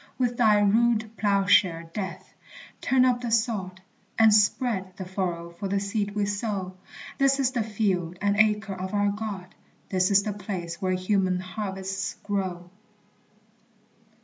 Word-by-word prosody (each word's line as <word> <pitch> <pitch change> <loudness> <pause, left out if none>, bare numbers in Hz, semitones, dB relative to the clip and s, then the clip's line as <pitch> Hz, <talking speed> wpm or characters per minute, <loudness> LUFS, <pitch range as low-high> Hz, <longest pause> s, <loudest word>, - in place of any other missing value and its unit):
With 245 -2 0
thy 220 -3 +4
rude 220 +1 +2
ploughshare, 195 -5 +2
Death, 190 -4 -6 0.5
turn 255 0 +3
up 245 -1 +2
the 240 - -3
sod, 215 -5 -1 0.4
And 220 -1 +6
spread 205 -3 +1
the 190 - -5
furrow 175 -2 -3
for 200 - -2
the 200 +1 0
seed 200 0 -2
we 205 -1 +1
sow; 200 -2 -3 0.5
This 275 0 +3
is 260 -2 +2
the 245 -3 -1
field 195 -5 -1
and 205 0 +1
Acre 210 -1 +2
of 190 +2 -5
our 205 0 +2
God, 200 -3 -5 0.4
This 185 -1 +2
is 200 0 +4
the 210 - -3
place 180 -4 -6
where 185 -1 0
human 185 0 +1
harvests 195 0 -4
grow! 185 -4 -3
200 Hz, 150 wpm, -26 LUFS, 185-215 Hz, 0.5 s, And